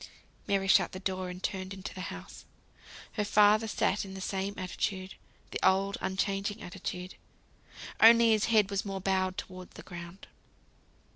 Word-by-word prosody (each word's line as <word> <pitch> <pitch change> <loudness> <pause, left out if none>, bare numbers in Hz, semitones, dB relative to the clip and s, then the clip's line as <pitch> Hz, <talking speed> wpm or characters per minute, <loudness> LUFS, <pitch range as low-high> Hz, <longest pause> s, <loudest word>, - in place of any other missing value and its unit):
Mary 195 -1 +1
shut 190 -2 +4
the 185 - -5
door, 185 -1 -3
and 180 +1 -8
turned 190 0 -3
into 190 0 -7
the 185 - -7
house. - - -9 0.7
Her 210 - -1
father 210 +2 +4
sat 205 -1 0
in 190 -1 -8
the - - -6
same 195 +1 -3
attitude; 185 0 -3 0.4
the - - -3
old 195 +1 +3
unchanging 195 +2 -2
attitude. 180 0 -6 0.9
Only 230 0 +8
his 215 -1 +3
head 215 -3 +3
was 200 +1 0
more 195 -2 -4
bowed 190 -1 0
towards 185 -1 -8
the - - -10
ground. 175 0 -9
195 Hz, 155 wpm, -30 LUFS, 185-200 Hz, 0.9 s, Only